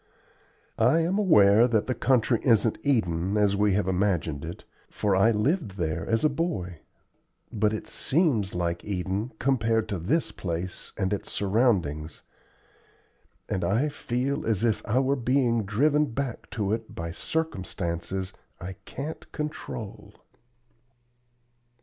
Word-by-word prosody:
I 165 Hz, -, +4 dB
am 180 Hz, +5 st, +1 dB
aware 110 Hz, -, +6 dB
that 110 Hz, -4 st, +1 dB
the 130 Hz, -, 0 dB
country 120 Hz, -1 st, +2 dB
isn't 115 Hz, -3 st, +3 dB
Eden, 95 Hz, -, +1 dB
as 100 Hz, -1 st, +3 dB
we 105 Hz, 0 st, +2 dB
have 100 Hz, -1 st, +1 dB
imagined 90 Hz, -6 st, 0 dB
it 85 Hz, +2 st, -7 dB, 0.3 s
for 100 Hz, -2 st, 0 dB
I 95 Hz, +4 st, +5 dB
lived 115 Hz, -, 0 dB
there 80 Hz, -3 st, -2 dB
as 115 Hz, 0 st, +1 dB
a -, -, +6 dB
boy 140 Hz, -, -3 dB, 0.7 s
but 105 Hz, -1 st, +2 dB
it 110 Hz, -, -4 dB
seems 130 Hz, -, +1 dB
like 85 Hz, -1 st, -1 dB
Eden 100 Hz, +4 st, -2 dB
compared 115 Hz, -4 st, +1 dB
to 100 Hz, -, -2 dB
this 145 Hz, -, 0 dB
place 85 Hz, 0 st, -5 dB
and 95 Hz, +2 st, 0 dB
its 100 Hz, -, -4 dB
surroundings; 95 Hz, -, 0 dB, 1.2 s
and 95 Hz, -4 st, -2 dB
I 115 Hz, +12 st, +1 dB
feel 135 Hz, +1 st, -2 dB
as 110 Hz, -2 st, 0 dB
if 110 Hz, -2 st, +1 dB
I 110 Hz, -, +1 dB
were 135 Hz, +1 st, +3 dB
being 120 Hz, -3 st, +1 dB
driven 145 Hz, +9 st, +2 dB
back 130 Hz, 0 st, -4 dB
to 105 Hz, -3 st, -1 dB
it 115 Hz, 0 st, -5 dB
by 85 Hz, 0 st, -4 dB
circumstances 95 Hz, -, -3 dB, 0.3 s
I 95 Hz, +2 st, -7 dB
can't 150 Hz, +4 st, -7 dB
control." 150 Hz, -8 st, -6 dB
105 Hz, 135 wpm, -27 LUFS, 95-130 Hz, 1.2 s, aware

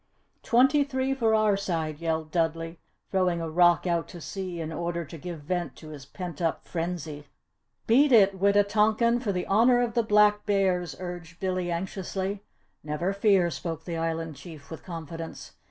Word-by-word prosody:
"Twenty 270 Hz, +5 st, +4 dB
three 265 Hz, -1 st, -1 dB
for 225 Hz, -4 st, +2 dB
our 215 Hz, -2 st, +3 dB
side!" 165 Hz, -6 st, -3 dB
yelled 160 Hz, -2 st, -2 dB
Dudley, 165 Hz, 0 st, -1 dB, 0.3 s
throwing 185 Hz, -3 st, +1 dB
a 165 Hz, -, -3 dB
rock 175 Hz, +2 st, +4 dB
out 170 Hz, -2 st, 0 dB
to 175 Hz, -, -10 dB
sea 185 Hz, 0 st, -5 dB
in 160 Hz, 0 st, -4 dB
order 170 Hz, +1 st, -3 dB
to 150 Hz, -, -10 dB
give 170 Hz, 0 st, -7 dB
vent 175 Hz, -1 st, -3 dB
to 155 Hz, -, -12 dB
his 140 Hz, -3 st, -10 dB
pent 175 Hz, -1 st, -7 dB
up 165 Hz, -1 st, -1 dB
frenzy. 165 Hz, -4 st, -4 dB, 0.6 s
"Beat 275 Hz, +5 st, +4 dB
it, 200 Hz, -5 st, +5 dB
Wita 200 Hz, +1 st, +4 dB
tonkan 220 Hz, +3 st, +2 dB
for 220 Hz, -5 st, -1 dB
the 180 Hz, -2 st, -2 dB
Honour 235 Hz, +5 st, +4 dB
of 240 Hz, -1 st, 0 dB
the 235 Hz, -, +3 dB
Black 210 Hz, -1 st, +4 dB
Bears," 185 Hz, -6 st, +1 dB
urged 175 Hz, -2 st, -7 dB
Billy, 185 Hz, -2 st, -1 dB
anxiously. 190 Hz, +2 st, -3 dB, 0.4 s
"Never 155 Hz, +6 st, -2 dB
fear!" 195 Hz, -4 st, +3 dB
spoke 165 Hz, -1 st, -5 dB
the 170 Hz, -2 st, -4 dB
Island 165 Hz, -1 st, -2 dB
Chief 155 Hz, 0 st, -12 dB
with 160 Hz, -, -8 dB
confidence. 165 Hz, -1 st, -7 dB
180 Hz, 170 wpm, -27 LUFS, 165-205 Hz, 0.6 s, it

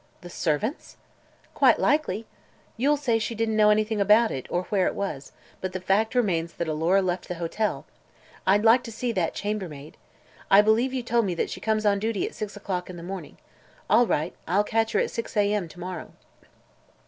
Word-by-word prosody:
"The 175 Hz, -, -10 dB
servants'!" 170 Hz, -, -2 dB, 0.6 s
"Quite -, -, +5 dB
likely. 230 Hz, -8 st, +1 dB, 0.5 s
You'll 285 Hz, +6 st, +2 dB
say 240 Hz, -6 st, +1 dB
she 225 Hz, +1 st, -3 dB
didn't 220 Hz, 0 st, 0 dB
know 210 Hz, -1 st, +5 dB
anything 215 Hz, 0 st, +2 dB
about 215 Hz, +3 st, +5 dB
it, 130 Hz, -, -5 dB
or 175 Hz, -, -1 dB
where 190 Hz, 0 st, +1 dB
it -, -, -2 dB
was; 150 Hz, -9 st, -4 dB, 0.3 s
but 185 Hz, -1 st, -4 dB
the 185 Hz, -, -3 dB
fact 205 Hz, +5 st, +1 dB
remains 170 Hz, -8 st, +1 dB
that 170 Hz, -, -4 dB
Alora 165 Hz, +5 st, +2 dB
left 180 Hz, -1 st, -2 dB
the 180 Hz, -, -4 dB
hotel. 175 Hz, +6 st, -2 dB, 0.6 s
I'd 200 Hz, +2 st, +4 dB
like 230 Hz, +3 st, +6 dB
to 230 Hz, -, -7 dB
see 235 Hz, +2 st, -2 dB
that 180 Hz, -7 st, -1 dB
chambermaid. 180 Hz, -9 st, -5 dB, 0.5 s
I 195 Hz, +1 st, +8 dB
believe 225 Hz, +5 st, +3 dB
you 260 Hz, -2 st, -3 dB
told 235 Hz, -1 st, +1 dB
me 180 Hz, -3 st, -2 dB
she -, -, -7 dB
comes 215 Hz, -1 st, 0 dB
on 200 Hz, -1 st, +3 dB
duty 220 Hz, -1 st, -1 dB
at -, -, -6 dB
six 210 Hz, -1 st, -6 dB
o'clock 185 Hz, -3 st, -4 dB
in 180 Hz, -, -8 dB
the 170 Hz, -, -9 dB
morning. 185 Hz, -3 st, -7 dB, 0.5 s
All 235 Hz, +3 st, +5 dB
right. 160 Hz, -1 st, -1 dB
I'll 195 Hz, +5 st, +2 dB
catch 225 Hz, +1 st, 0 dB
her -, -, +3 dB
at -, -, 0 dB
six 230 Hz, -1 st, -5 dB
a. 205 Hz, 0 st, +3 dB
m. 200 Hz, -5 st, -1 dB
to 175 Hz, -, -14 dB
morrow." 180 Hz, -2 st, -6 dB
205 Hz, 200 wpm, -25 LUFS, 180-225 Hz, 0.6 s, I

